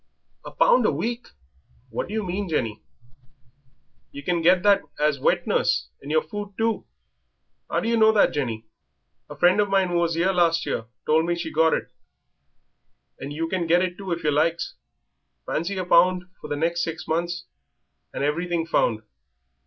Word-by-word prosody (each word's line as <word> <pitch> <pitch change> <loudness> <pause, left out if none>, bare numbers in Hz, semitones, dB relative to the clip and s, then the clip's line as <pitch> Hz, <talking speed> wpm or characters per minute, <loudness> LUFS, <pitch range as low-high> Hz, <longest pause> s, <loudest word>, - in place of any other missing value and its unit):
"A - - -8
pound - - +4
a - - +2
week! 240 +1 -3 0.6
What - - -3
do 210 - -6
you 220 - -1
mean, 185 +1 -3
Jenny?" 115 -9 -2 1.3
"Yer 140 - -9
can 175 +2 0
get 180 +2 +4
that 205 -1 +5 0.2
as 150 -2 +1
wet - - +1
nurse, 65 -1 +1
and 140 - -9
yer 155 +1 +3
food 205 +3 -7
too." 225 0 -1 0.8
"How - - 0
do 225 - -3
yer 235 - +2
know 220 0 +6
that, 215 - +3
Jenny?" 115 -6 -3 0.6
"A - - -9
friend 180 +4 +4
of 205 - 0
mine 195 -2 +2
who 175 - 0
was 170 -1 0
'ere 185 +3 +2
last 170 -2 +2
year 115 - -2 0.2
told 160 +2 +2
me 175 - +1
she 170 -2 -5
got 160 +1 +3
it, - - -5 1.3
and 135 +2 -6
you 160 +3 -2
can 175 -1 -2
get 175 +2 +4
it 180 -1 -2
too 195 -1 -7
if 170 0 -2
yer 150 - +2
likes. 165 +3 0 0.7
Fancy 175 +5 -2
a 185 - -2
pound 180 +1 +4 0.2
for - - -7
the 145 - -2
next 170 +3 0
six 165 -1 -5
months, 175 +2 -2 0.7
and - - -4
everything 165 +3 -1
found. 110 -9 +1
170 Hz, 185 wpm, -24 LUFS, 155-185 Hz, 1.3 s, know